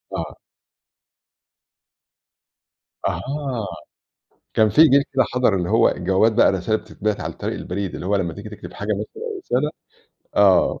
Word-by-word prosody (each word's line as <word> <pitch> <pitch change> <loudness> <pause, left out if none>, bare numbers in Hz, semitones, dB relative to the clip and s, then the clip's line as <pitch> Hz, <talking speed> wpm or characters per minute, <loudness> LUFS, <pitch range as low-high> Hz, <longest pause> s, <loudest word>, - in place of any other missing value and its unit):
آه. - - -5 2.7
أها 135 -6 -3 0.9
كان 110 -1 +4
في 155 - +6
جيل 140 -3 +6
كده 130 -1 +3
حضر 125 -5 +3
اللي 90 -2 -1
هو - - +5
الجوابات 100 +4 +2
بقى 110 - +5
الرسايل 95 +4 0
اللي - - -17
بتتبعت 105 -1 -2
عن - - -4
طريق - - -4
البريد، 95 +1 -4
اللي 90 - -6
هو 100 +1 +2
لما 90 -4 -1
تيجي 100 +2 -8
تكتب 95 -5 -10
حاجة 105 +3 -7
مثلًا 105 - -5
أو 405 - -6
رسالة 150 - -1 0.7
آه 100 -2 +4
105 Hz, 150 wpm, -22 LUFS, 95-130 Hz, 2.7 s, في